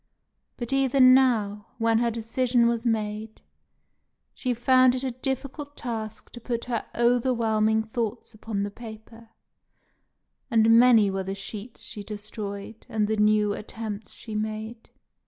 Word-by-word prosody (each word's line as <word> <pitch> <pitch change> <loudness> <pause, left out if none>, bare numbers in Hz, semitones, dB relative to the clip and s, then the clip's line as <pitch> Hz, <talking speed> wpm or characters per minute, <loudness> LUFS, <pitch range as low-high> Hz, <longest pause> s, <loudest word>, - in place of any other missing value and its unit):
But 240 +1 -4
even 265 -1 +5
now, 220 -6 +2
when 225 -1 +2
her 235 0 +2
decision 235 +1 +1
was 235 0 0
made, 215 -1 -2 0.9
she 255 - -2
found 255 +1 +4
it 255 - -2
a 260 - -1
difficult 270 +3 -5
task 220 -3 -6
to 240 - -10
put 235 0 -3
her 240 -3 -3
overwhelming 230 -3 +2
thoughts 230 0 -4
upon 215 -2 -4
the 205 - -4
paper; 225 +1 -12 1.2
and 225 0 +5
many 230 -5 +6
were 190 0 -2
the 195 +1 -4
sheets 210 +3 -7
she 210 - -5
destroyed, 210 +1 -7
and 215 -3 0
the 220 0 0
new 210 -1 +3
attempts 215 0 -6
she 220 - -9
made. 215 +2 -4
225 Hz, 135 wpm, -26 LUFS, 215-245 Hz, 1.2 s, many